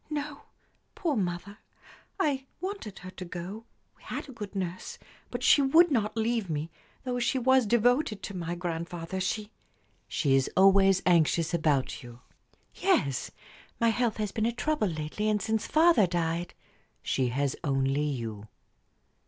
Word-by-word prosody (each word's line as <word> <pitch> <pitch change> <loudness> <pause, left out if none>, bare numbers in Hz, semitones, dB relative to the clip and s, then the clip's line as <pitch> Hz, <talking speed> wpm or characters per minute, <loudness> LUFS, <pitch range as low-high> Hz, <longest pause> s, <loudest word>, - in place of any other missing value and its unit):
"No; 295 -1 -4 0.5
poor 325 -6 -1
mother! 190 0 -3 0.6
I 275 -7 0
wanted 370 - -5
her 185 - -7
to 185 - -8
go 180 +5 -7 0.3
we - - -28
had - - -6
a - - -9
good 210 -3 -8
nurse 185 -2 -4 0.3
but 245 0 -5
she 285 - +6
would 320 +5 +5
not 215 -4 0
leave 225 -3 0
me, 155 +1 -3 0.3
though 250 -1 -2
she 245 +2 +1
was 260 -1 +4
devoted 240 +1 +2
to 200 - -6
my 170 -1 -3
grandfather. 170 +1 -4
She 210 +3 -2 0.3
" - - -40
"She 140 -4 +1
is 135 -1 +2
always 195 0 +5
anxious 170 -1 +3
about 150 -5 +1
you?" 120 0 -12 0.5
"Yes. 145 - +1 0.5
My 230 - +4
health 230 0 0
has 210 -2 -2
been 220 0 0
a - - +1
trouble 250 -1 0
lately, 160 +6 -2
and 210 -1 +2
since 220 +1 -1
father 315 - +5
died 170 0 -2 0.2
" - - -40
"She 130 -2 0
has 135 +2 -1
only 135 -1 +1
you." 115 -7 -4
195 Hz, 160 wpm, -29 LUFS, 165-240 Hz, 0.6 s, she